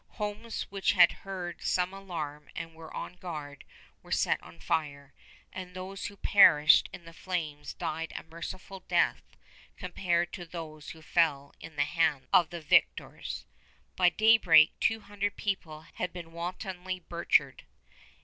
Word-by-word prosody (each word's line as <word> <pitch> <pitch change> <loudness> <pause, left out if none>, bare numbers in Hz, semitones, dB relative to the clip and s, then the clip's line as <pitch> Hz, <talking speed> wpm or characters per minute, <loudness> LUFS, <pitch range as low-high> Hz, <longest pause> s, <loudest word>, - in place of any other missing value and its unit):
Homes 210 +1 -4
which 195 -1 +1
had 175 -3 +7
heard 180 -3 -7
some 180 +1 0
alarm 155 -7 -6
and 165 0 -6
were 160 0 -12
on 180 - -6
guard 150 -6 -7 0.4
were - - -16
set - - +2
on 85 -1 -15
fire, 140 - -2 0.4
and 185 -1 -8
those 185 +1 -5
who 200 - -11
perished 155 -8 +6
in 170 - -11
the 165 - -12
flames 160 -5 -4
died 165 +1 -4
a - - -5
merciful 170 +4 -8
death - - +1 0.6
compared 175 -2 -1
to 180 - -6
those 160 -3 -8
who 160 0 -11
fell 145 -5 +1
in 165 - -11
the 145 - +2
hands 155 -4 +1
of 170 - +6
the 170 -1 -7
victors. 155 - +1 0.5
By 180 -1 +5
daybreak 180 -7 +6
two 225 0 +1
hundred 205 0 -3
people 165 -7 -3
had 180 - -3
been 170 -2 -9
wantonly 180 +2 -5
butchered. 170 0 +1
175 Hz, 150 wpm, -30 LUFS, 155-185 Hz, 0.6 s, had